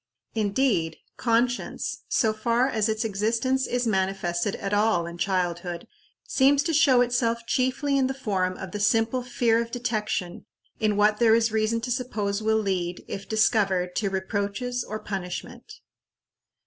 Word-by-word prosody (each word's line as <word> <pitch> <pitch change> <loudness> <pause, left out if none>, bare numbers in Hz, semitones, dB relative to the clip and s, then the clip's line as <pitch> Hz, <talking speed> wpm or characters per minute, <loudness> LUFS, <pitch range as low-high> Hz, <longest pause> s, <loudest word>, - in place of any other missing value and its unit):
Indeed, 205 -6 +1 0.2
conscience, 240 +1 -1
so 220 -2 +2
far 235 +3 +1
as 220 -4 0
its 220 +1 -1
existence 225 +6 0
is 245 0 -1
manifested 190 -2 0
at 195 0 -4
all 205 -4 +2
in 170 0 -8
childhood, 175 -2 -2 0.4
seems 280 +1 +3
to 330 - -1
show 270 -5 +5
itself 235 -1 0
chiefly 270 +3 +1
in 260 - +2
the 265 - -3
form 190 -8 -1
of 190 -2 -7
the 210 - -4
simple 225 +4 +2
fear 240 -2 +1
of 230 - -5
detection 215 -7 -3 0.3
in 215 -2 +1
what 210 +1 +4
there 225 -2 +5
is 225 -1 +2
reason 220 +1 0
to 250 +2 -3
suppose 220 -5 -2
will 220 0 +2
lead, 185 -4 -2
if 195 0 -7
discovered, 195 -5 +2
to 200 - 0
reproaches 205 +6 -2
or 215 - -5
punishment. 200 - -6
220 Hz, 150 wpm, -26 LUFS, 195-245 Hz, 0.4 s, show